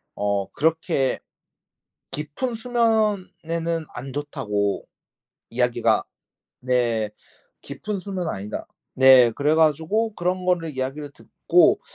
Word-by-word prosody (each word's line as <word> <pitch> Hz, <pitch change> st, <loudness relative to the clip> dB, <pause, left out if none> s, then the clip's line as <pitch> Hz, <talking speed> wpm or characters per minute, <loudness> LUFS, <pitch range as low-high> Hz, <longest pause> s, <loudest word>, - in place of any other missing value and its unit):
어 100 Hz, -1 st, -1 dB
그렇게 155 Hz, -4 st, 0 dB, 0.9 s
깊은 155 Hz, -, -3 dB
수면에는 200 Hz, -9 st, 0 dB
안 130 Hz, +2 st, -7 dB
좋다고 120 Hz, -9 st, -2 dB, 0.7 s
이야기가 120 Hz, -2 st, +1 dB, 0.6 s
네 120 Hz, -4 st, 0 dB, 0.5 s
깊은 210 Hz, -2 st, -5 dB
수면 185 Hz, -3 st, -4 dB
아니다. 105 Hz, -2 st, -5 dB, 0.3 s
네 130 Hz, -2 st, +7 dB
그래가지고 160 Hz, -, +2 dB
그런 180 Hz, 0 st, -1 dB
거를 170 Hz, -3 st, +1 dB
이야기를 135 Hz, +3 st, -4 dB
듣고 -, -, +2 dB
150 Hz, 210 characters per minute, -23 LUFS, 125-180 Hz, 0.9 s, 네